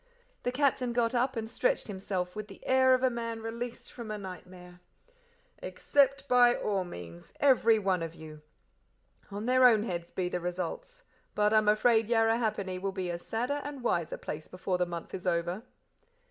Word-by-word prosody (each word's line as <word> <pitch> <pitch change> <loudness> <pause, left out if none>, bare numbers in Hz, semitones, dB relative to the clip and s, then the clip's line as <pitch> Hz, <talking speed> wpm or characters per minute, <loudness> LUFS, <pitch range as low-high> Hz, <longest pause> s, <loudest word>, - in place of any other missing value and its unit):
The 245 - -1
Captain 255 -2 +1
got 235 0 +1
up 255 +2 +1
and 225 -1 -3
stretched - - 0
himself 190 -2 -4
with 215 -1 -5
the 195 - -14
air 260 0 +5
of 255 - -3
a 260 - +5
man 230 -1 -4
released 235 +1 -6
from 235 -3 -8
a 215 - -3
nightmare. 180 -2 -10 0.8
"Accept 275 -1 +1
by 245 -1 +5
all 200 -3 -1
means 85 - -10
every 240 -5 +5
one 190 -4 0
of 165 0 -5
you. 155 -2 -11 0.9
On 205 +2 -5
their 255 +1 +6
own 220 -3 +4
heads 170 -5 -4
be 185 -1 -2
the 180 - -2
results; 185 - -5 0.3
but 210 +1 +3
I'm 215 -1 +4
afraid 220 +1 +3
Yarrahappini 225 -5 +1
will 195 0 -1
be 185 -2 -3
a 170 - -4
sadder 250 +10 -2
and 285 -3 -7
wiser 170 -8 0
place 155 +1 -6
before 185 0 -3
the 180 - +1
month 170 -1 -7
is 185 0 -5
over." 175 +3 0
215 Hz, 175 wpm, -30 LUFS, 180-245 Hz, 0.9 s, their